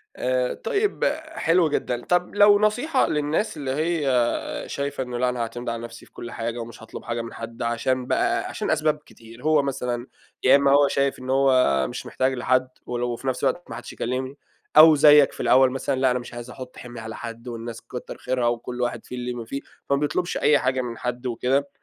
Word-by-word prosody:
آآ 125 0 0
طيب، 435 -1 -1 0.3
حلو 175 - +2
جدًا. 125 -4 -2
طب 180 +1 +1
لو 205 0 +6
نصيحة 245 +7 +2
للناس 150 +7 -1
اللي 140 -3 -3
هي 160 +3 0 0.7
شايفة 140 -1 -3
إنه 125 -1 -4
لأ 125 +1 +2
أنا 125 -1 -3
هاعتمد 120 +1 -4
على 115 0 -3
نفسي 115 0 -10
في - - -25
كل 120 - -8
حاجة 115 +1 -4
ومش 115 -1 -8
هاطلب 110 - -9
حاجة 115 0 -3
من 115 - -8
حد 115 0 -7
عشان 125 +2 0
بقى - - +1
عشان - - -3
أسباب 155 0 +1
كتير، 115 +1 -15
هو 155 -2 +4
مثلًا 125 -3 -3 0.4
يا 130 - +7
إمّا 140 0 +3
هو 140 0 +5
شايف 140 0 0
إن 130 0 -6
هو 130 - +3
مش - - -7
محتاج 130 +1 0
لحد 130 +1 +1 0.2
ولو 120 -1 -2
في 135 - -10
نفس 130 -1 -1
الوقت 175 - -1
ما - - -5
حدّش - - -8
يكلّمني، 130 +3 -3 0.4
أو 155 +1 +10
زيّك 145 -1 +7
في - - -12
الأول 130 0 +5
مثلًا، 135 0 -2
لأ 130 -1 +4
أنا 125 - +1
مش 120 -1 -10
عايز 120 +1 -8
أحُط 125 0 -10
حِمْل 120 -1 -9
على 110 -1 -7
حد 115 +1 -8
والناس 115 -1 -6
كتّر 125 - -8
خيرها 125 -2 -1
وكل 120 +1 -2
واحد 120 -2 -2
فيه 125 - -8
اللي 125 0 -3
ما 120 -1 -6
فيه، 135 +5 -5 0.3
فما 140 - +3
بيطلبش 155 +4 -1
أي 150 -1 +4
حاجة 130 0 0
من 120 -2 -6
حد 125 +1 -4
وكده، 130 +4 0
130 Hz, 210 wpm, -24 LUFS, 120-145 Hz, 0.7 s, أو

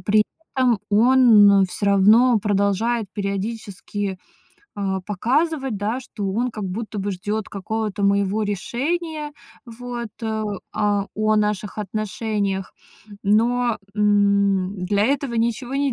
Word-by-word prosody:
при 210 +1 +3 0.3
этом 245 -5 +3
он 215 -4 +6
всё 200 - -3
равно 215 +5 +5
продолжает 205 +3 0
периодически, 200 -1 -4 0.6
а, 195 -2 -2
показывать, 265 - 0
да, 220 +5 -2
что 205 -6 -5
он 240 +5 -1
как 215 -3 -6
будто 210 +3 -5
бы 200 +1 -2
ждёт 205 +3 -3
какого-то 210 0 -3
моего 200 +1 +2
решения, 295 - -3 0.3
вот, 240 0 -6
а, 220 -1 -2 0.3
а, 205 -1 +1
о 215 0 +2
наших 210 -1 -1
отношениях. 205 -1 -3 0.5
Но, 235 +3 +2 0.2
м, 200 -2 +2
для 200 +2 +1
этого 275 -1 0
ничего 235 +3 -1
не 280 -2 +1
210 Hz, 115 wpm, -22 LUFS, 200-235 Hz, 0.6 s, он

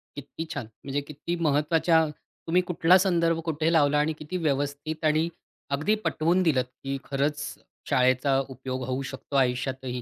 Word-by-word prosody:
किती 150 +3 -6
छान, - - -4 0.2
म्हणजे 140 +1 -2
किती 150 +4 -5
महत्त्वाच्या 160 +3 +3 0.4
तुम्ही 180 +2 +3
कुठला 180 +1 +5
संदर्भ 170 -3 +2
कुठे 160 +1 0
लावला 150 -2 +4
आणि 155 +2 +1
किती 155 +5 -4
व्यवस्थित 145 +1 -2
आणि 155 +2 +3 0.5
अगदी 155 +10 +1
पटवून 170 +4 +2
दिलंत, 130 -7 +2 0.2
की 135 0 -2
खरंच 145 +1 -1 0.5
शाळेचा 130 +2 +3
उपयोग 130 0 -5
होऊ 130 +1 -1
शकतो 135 +1 -8
आयुष्यातही. 130 0 0
150 Hz, 145 wpm, -27 LUFS, 135-165 Hz, 0.5 s, कुठला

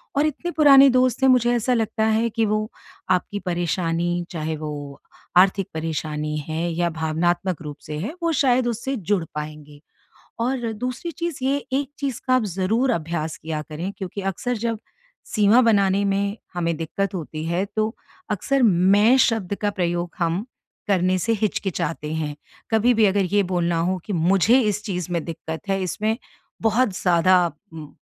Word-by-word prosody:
और 285 +2 +3
इतने 310 +4 -2
पुराने 280 -4 +7
दोस्त 255 0 +2
हैं, 265 - +6
मुझे 245 -2 +4
ऐसा 245 +2 +1
लगता 220 -1 0
है 220 +1 +2
कि 225 0 0
वो 215 +1 -1 0.4
आपकी 185 +3 0
परेशानी, 175 -1 -1
चाहे 160 -1 -3
वो 145 -2 -7 0.4
आर्थिक 195 +1 +4
परेशानी 155 -1 -3
है 165 +2 -2
या 175 +1 0
भावनात्मक 165 +2 -1
रूप 150 -2 -7
से 150 0 -5
है, 220 - -4
वो 335 - +2
शायद, 255 -3 +3
उससे 240 +4 -2
जुड़ 200 -4 0
पाएँगे। 150 -1 -7 0.6
और 240 -1 -1
दूसरी 255 +9 -4
चीज़ 335 -2 -4
ये 275 +1 +2 0.2
एक 275 0 0
चीज़ 275 -4 -3
का 255 - +3
आप 250 -4 +3
ज़रूर 205 +7 0
अभ्यास 160 -4 -2
किया 155 -1 -4
करें 160 +6 -5
क्योंकि 195 +1 -5
अक्सर 245 +6 -3
जब 230 0 -2 0.6
सीमा 215 +3 +5
बनाने 200 -3 +3
में 200 +1 0 0.2
हमें 170 -2 -1
दिक्कत 180 +5 -3
होती 155 -2 -5
है 175 +3 0
तो 215 +1 0 0.4
अक्सर 270 +6 0
मैं 205 +4 +5
शब्द 215 -5 -1
का 205 - +2
प्रयोग 175 -2 -1
हम 170 +2 0 0.5
करने 185 -1 +2
से 230 +5 0
हिचकिचाते 165 -7 -2
हैं। 150 -2 -3 0.4
कभी 230 +2 +3
भी 220 - +4
अगर 195 0 +2
ये 205 - +5
बोलना 175 -2 0
हो 185 - -1
कि 210 - -3
मुझे 190 +9 +4
इस 210 -2 0
चीज़ 180 -4 -3
में 170 -2 -1
दिक्कत 160 -1 -6
है 195 -1 0
इसमें 215 +5 -1 0.5
बहुत 220 -2 +2
ज़्यादा 180 0 +4 0.2
म 155 -2 -8
195 Hz, 165 wpm, -23 LUFS, 170-230 Hz, 0.6 s, पुराने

